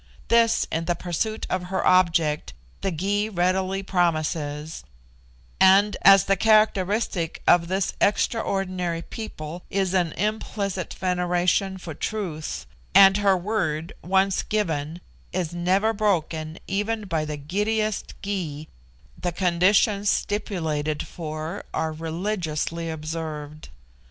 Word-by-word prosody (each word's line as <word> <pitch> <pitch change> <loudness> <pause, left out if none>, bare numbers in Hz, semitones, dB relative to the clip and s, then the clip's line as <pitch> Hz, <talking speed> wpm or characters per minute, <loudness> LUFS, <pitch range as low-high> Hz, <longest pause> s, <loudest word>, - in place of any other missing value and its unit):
This, 230 -1 +4
in 165 +1 -1
the 175 - 0
pursuit 185 +6 -2
of 185 -1 -2
her 190 +1 -2
object, 165 -4 +3 0.3
the 195 - 0
Gy 200 +5 -1
readily 190 +1 0
promises; 155 -4 -1 0.8
and 195 +2 +6
as 195 -1 +8
the 195 - +2
characteristic 205 -4 +2
of 170 -1 +5
this 190 +1 -1
extraordinary 185 -5 0
people 175 -6 -7
is 190 -2 0
an 175 -4 +1
implicit 200 -2 -2
veneration 180 +1 0
for 175 -3 -7
truth, 165 -3 -4 0.3
and 195 0 +8
her 200 -2 +3
word 170 -5 -2
once 190 +1 +2
given 165 -6 -2 0.3
is 175 -3 -2
never 190 +6 +2
broken 165 -6 -1
even 210 +3 -1
by 165 -5 -1
the 150 -1 -4
giddiest 210 +7 -1
Gy, 165 -7 -4 0.5
the 175 - -3
conditions 195 +4 +2
stipulated 160 -7 -1
for 155 +2 -6
are 160 -1 -1
religiously 165 -1 -3
observed. 155 -1 -6
180 Hz, 110 wpm, -24 LUFS, 160-200 Hz, 0.8 s, as